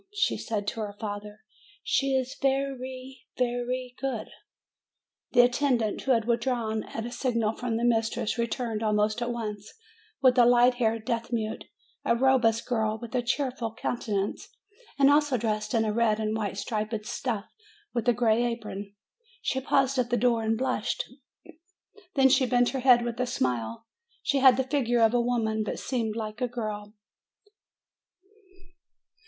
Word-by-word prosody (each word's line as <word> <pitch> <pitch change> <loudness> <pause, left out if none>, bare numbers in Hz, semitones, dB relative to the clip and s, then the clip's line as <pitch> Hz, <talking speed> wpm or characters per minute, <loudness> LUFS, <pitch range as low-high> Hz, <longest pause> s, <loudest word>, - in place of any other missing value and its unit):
Then - - -46
she 415 - +2
said 210 -3 -3
to - - -7
her 205 -2 -4
father, 210 0 -6 0.4
"She 275 -1 +1
is 260 0 -1
ve 270 0 +2
ry, 260 -1 -7 0.2
ve 245 -1 +1
ry 255 0 -3
good." 260 -5 -3 1.0
The 245 - +8
attendant, 245 -3 +1
who 270 - 0
had 225 -2 +1
withdrawn 235 -2 0
at 225 - -5
a 240 - -5
signal 230 -4 0
from 235 -1 -2
the 235 - -2
mistress, 225 -2 +1
returned 235 -2 -2
almost 215 +1 +1
at 240 - -1
once 210 -3 -5 0.5
with 255 -1 +4
a 240 - +7
light 245 +1 +5
haired 225 -2 0
deaf 235 +1 -2
mute, 220 -2 -2 0.4
a - - +2
robust 240 -3 +3
girl, 220 -3 0
with 235 -1 -9
a 250 - +1
cheerful 245 -2 -2
coun 240 - -2
tenance, 200 -2 -2 0.5
and 280 0 +6
also 290 -3 +3
dressed 215 -1 -2
in 225 - +3
the 215 -1 -1
red 220 -1 +2
and 215 0 -1
white 205 -3 -3
striped 215 0 -3
stuff, 220 -3 -3 0.5
with 240 0 0
a - - +5
gray 230 0 +2
apron. 210 -4 -4 0.5
She 265 - 0
paused 270 0 +2
at 240 -1 +1
the 245 - +1
door 235 0 +2
and 220 0 0
blushed; 260 +3 -1 1.1
then 265 -1 +5
she 260 -1 +4
bent 245 -1 +3
her 270 - -3
head 245 -2 +5
with 235 0 -4
a 250 - 0
smile. 120 - -2 0.4
She 280 -1 +1
had 260 -2 +7
the 265 - +2
figure 250 -3 +1
of 225 +1 +4
a 245 - +3
woman, 225 -3 0
but - - -4
seemed 225 -4 -2
like 215 +1 -5
a 250 - +2
girl. 215 -3 -5
235 Hz, 170 wpm, -27 LUFS, 220-255 Hz, 1.1 s, The